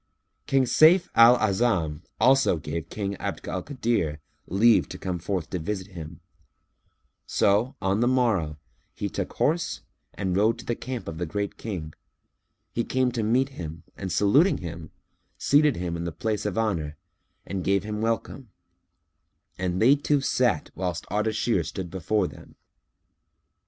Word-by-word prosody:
King 135 Hz, -1 st, +3 dB
Sayf 160 Hz, +8 st, +5 dB
al 115 Hz, +2 st, +8 dB
A'azam 95 Hz, -8 st, +1 dB, 0.2 s
also 135 Hz, -8 st, +4 dB
gave 80 Hz, +1 st, -5 dB
King 100 Hz, -2 st, -3 dB
Abd -, -, -5 dB
al 95 Hz, -, -2 dB
Kadir 115 Hz, -, -1 dB, 0.3 s
leave 110 Hz, +5 st, +4 dB
to -, -, -7 dB
come 90 Hz, -2 st, -3 dB
forth 90 Hz, -1 st, -3 dB
to 90 Hz, -, -2 dB
visit 95 Hz, +3 st, -4 dB
him; 85 Hz, -2 st, -9 dB, 1.1 s
so, 110 Hz, +7 st, +2 dB
on 95 Hz, +2 st, +1 dB
the 120 Hz, -, +3 dB
morrow, 110 Hz, -, +1 dB, 0.4 s
he -, -, -2 dB
took -, -, -4 dB
horse 165 Hz, +3 st, 0 dB, 0.3 s
and 95 Hz, -2 st, -1 dB
rode 110 Hz, +4 st, +3 dB
to -, -, -10 dB
the 120 Hz, -, 0 dB
camp 125 Hz, -1 st, -6 dB
of 80 Hz, 0 st, -6 dB
the 90 Hz, -, -2 dB
Great 100 Hz, +4 st, -3 dB
King, 85 Hz, -9 st, -6 dB, 0.8 s
who 115 Hz, -, 0 dB
came 130 Hz, 0 st, +1 dB
to 120 Hz, -2 st, -2 dB
meet 125 Hz, +5 st, +2 dB
him 80 Hz, -, -8 dB
and 95 Hz, -2 st, -5 dB
saluting 140 Hz, -, +4 dB
him, 85 Hz, -2 st, -7 dB, 0.5 s
seated 145 Hz, 0 st, +4 dB
him 85 Hz, -1 st, -3 dB
in 85 Hz, -, -4 dB
the 85 Hz, -, -3 dB
place 105 Hz, +3 st, -2 dB
of 105 Hz, -, -3 dB
honour, 85 Hz, -10 st, -1 dB, 0.5 s
and 95 Hz, 0 st, -4 dB
gave 100 Hz, +1 st, +2 dB
him 105 Hz, 0 st, -4 dB
welcome; 115 Hz, +2 st, -2 dB, 1.1 s
and 90 Hz, -1 st, -1 dB
they 125 Hz, +5 st, +6 dB
two 145 Hz, 0 st, +1 dB
sat 125 Hz, -, +1 dB
whilst 90 Hz, -1 st, -3 dB
Ardashir 105 Hz, -2 st, +1 dB
stood 85 Hz, +2 st, -6 dB
before 95 Hz, +2 st, 0 dB
them. -, -, -13 dB
100 Hz, 155 wpm, -26 LUFS, 85-120 Hz, 1.1 s, al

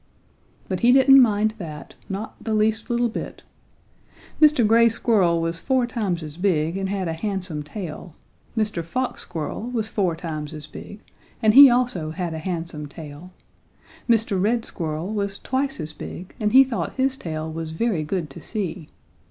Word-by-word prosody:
But 185 Hz, -2 st, -2 dB
he 240 Hz, +4 st, +5 dB
didn't 270 Hz, +1 st, +7 dB
mind 215 Hz, -2 st, +2 dB
that, 155 Hz, -5 st, -8 dB, 0.2 s
not 200 Hz, +3 st, -6 dB
the 220 Hz, -1 st, -1 dB
least 215 Hz, +1 st, +1 dB
little 240 Hz, 0 st, +2 dB
bit. 230 Hz, -, -6 dB, 1.0 s
Mr. 300 Hz, -6 st, +6 dB
Gray 230 Hz, +2 st, +5 dB
Squirrel 200 Hz, -7 st, +2 dB
was 165 Hz, 0 st, -2 dB
four 260 Hz, +2 st, +1 dB
times 205 Hz, -8 st, -2 dB
as 150 Hz, 0 st, -8 dB
big 170 Hz, -3 st, +1 dB
and 195 Hz, 0 st, -2 dB
had 195 Hz, -2 st, -2 dB
a 165 Hz, -, -2 dB
handsome 185 Hz, -3 st, -3 dB
tail, 165 Hz, 0 st, -8 dB, 0.4 s
Mr. 210 Hz, -6 st, 0 dB
Fox 255 Hz, +10 st, -3 dB
Squirrel 165 Hz, -1 st, -5 dB
was 225 Hz, -3 st, -2 dB
four 185 Hz, -5 st, 0 dB
times 155 Hz, -3 st, -5 dB
as 150 Hz, -1 st, -8 dB
big 205 Hz, +6 st, -11 dB, 0.4 s
and 215 Hz, -1 st, +5 dB
he 275 Hz, +2 st, +11 dB
also 240 Hz, -10 st, 0 dB
had 170 Hz, +1 st, -4 dB
a 160 Hz, -, -4 dB
handsome 165 Hz, -3 st, -4 dB
tail, 150 Hz, +4 st, -10 dB, 0.8 s
Mr. 220 Hz, -4 st, +2 dB
Red 230 Hz, +3 st, +1 dB
Squirrel 160 Hz, +4 st, -3 dB
was 200 Hz, -1 st, -2 dB
twice 270 Hz, -1 st, -2 dB
as 155 Hz, -1 st, -5 dB
big 180 Hz, +4 st, -9 dB
and 210 Hz, -2 st, +1 dB
he 265 Hz, +3 st, +8 dB
thought 260 Hz, -3 st, -3 dB
his 265 Hz, 0 st, 0 dB
tail 160 Hz, -8 st, -5 dB
was 165 Hz, 0 st, -5 dB
very 190 Hz, 0 st, 0 dB
good 155 Hz, -1 st, -3 dB
to -, -, -10 dB
see. 185 Hz, -7 st, -5 dB
195 Hz, 170 wpm, -23 LUFS, 165-230 Hz, 1.0 s, he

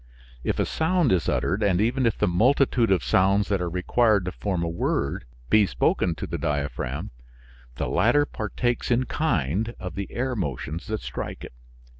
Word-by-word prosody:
If -, -, -1 dB
a -, -, +1 dB
sound 165 Hz, -, +1 dB
is 90 Hz, -3 st, +1 dB
uttered, 100 Hz, +5 st, 0 dB
and 95 Hz, -4 st, +2 dB
even 120 Hz, +4 st, +2 dB
if 115 Hz, -, 0 dB
the 105 Hz, -, +1 dB
multitude 120 Hz, +5 st, +3 dB
of 95 Hz, -, +2 dB
sounds 100 Hz, +2 st, +2 dB
that 100 Hz, -3 st, +1 dB
are 90 Hz, -, -1 dB
required 100 Hz, +3 st, +2 dB
to 90 Hz, -, -2 dB
form 90 Hz, -4 st, -2 dB
a -, -, -1 dB
word, 85 Hz, -6 st, -1 dB, 0.3 s
be 105 Hz, -2 st, +5 dB
spoken 85 Hz, -2 st, +1 dB
to -, -, -5 dB
the -, -, -4 dB
diaphragm, 70 Hz, -1 st, -3 dB, 0.6 s
the -, -, -2 dB
latter 120 Hz, +11 st, +3 dB
partakes 120 Hz, 0 st, -2 dB
in 120 Hz, +1 st, +3 dB
kind 110 Hz, -, -1 dB
of 90 Hz, 0 st, -6 dB
the 100 Hz, 0 st, -5 dB
air 130 Hz, +1 st, -2 dB
motions 80 Hz, -, -4 dB
that 110 Hz, 0 st, -3 dB
strike -, -, -6 dB
it. -, -, -9 dB
100 Hz, 180 wpm, -25 LUFS, 90-120 Hz, 0.6 s, be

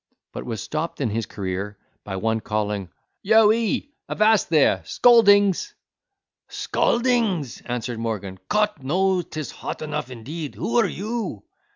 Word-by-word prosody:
—but -, -, -5 dB
was 115 Hz, -5 st, -5 dB
stopped 155 Hz, +2 st, -4 dB
in 130 Hz, -6 st, 0 dB
his 115 Hz, 0 st, -2 dB
career 100 Hz, +1 st, -4 dB, 0.3 s
by 95 Hz, -, -5 dB
one 110 Hz, +3 st, 0 dB
calling, 105 Hz, -3 st, -2 dB, 0.3 s
"Yo 220 Hz, +1 st, +5 dB
he, 230 Hz, +5 st, -1 dB, 0.2 s
avast 215 Hz, 0 st, +3 dB
there—scaldings!" 200 Hz, -, +4 dB, 0.7 s
"Scaldings!" 230 Hz, -, 0 dB
answered 120 Hz, -1 st, -3 dB
Morgan; 105 Hz, -5 st, -4 dB
"Cot 210 Hz, -8 st, +1 dB
knows 180 Hz, +4 st, +1 dB
'tis 155 Hz, -2 st, -5 dB
hot -, -, -6 dB
enough 150 Hz, -4 st, -4 dB
indeed: 140 Hz, +6 st, -7 dB
who 115 Hz, +1 st, -1 dB
are -, -, +3 dB
you?" 220 Hz, +2 st, -4 dB
150 Hz, 130 wpm, -23 LUFS, -, 0.7 s, Yo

